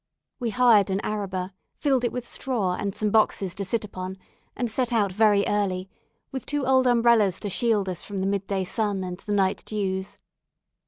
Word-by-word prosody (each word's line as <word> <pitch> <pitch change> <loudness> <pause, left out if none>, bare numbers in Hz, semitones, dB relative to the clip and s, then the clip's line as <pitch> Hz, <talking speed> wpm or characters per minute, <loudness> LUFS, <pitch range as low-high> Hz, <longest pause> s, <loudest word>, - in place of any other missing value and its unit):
We 240 -3 -1
hired 220 -4 +5
an 190 0 0
araba, 190 -3 -3 0.2
filled 270 -4 +1
it 240 - +1
with 250 -1 -5
straw, 225 -9 -1
and 200 +1 -3
some 210 -1 0
boxes 200 -4 +2
to 200 - -4
sit 215 +3 -1
upon, 185 -1 -6 0.4
and 245 - -1
set 245 +2 0
out 210 -5 +2
very 205 0 +4
early, 195 -2 -1 0.4
with 265 - -6
two 290 -2 -1
old 260 0 +4
umbrellas 235 -5 +4
to 205 - -3
shield 220 -3 +1
us 180 -2 -3
from 200 -2 -5
the 190 - 0
mid 200 0 -1
day 195 -1 -1
sun 200 0 -1
and 180 0 -5
the 210 - -7
night 195 -1 +1
dews. 190 -3 -3
205 Hz, 195 wpm, -25 LUFS, 190-235 Hz, 0.4 s, hired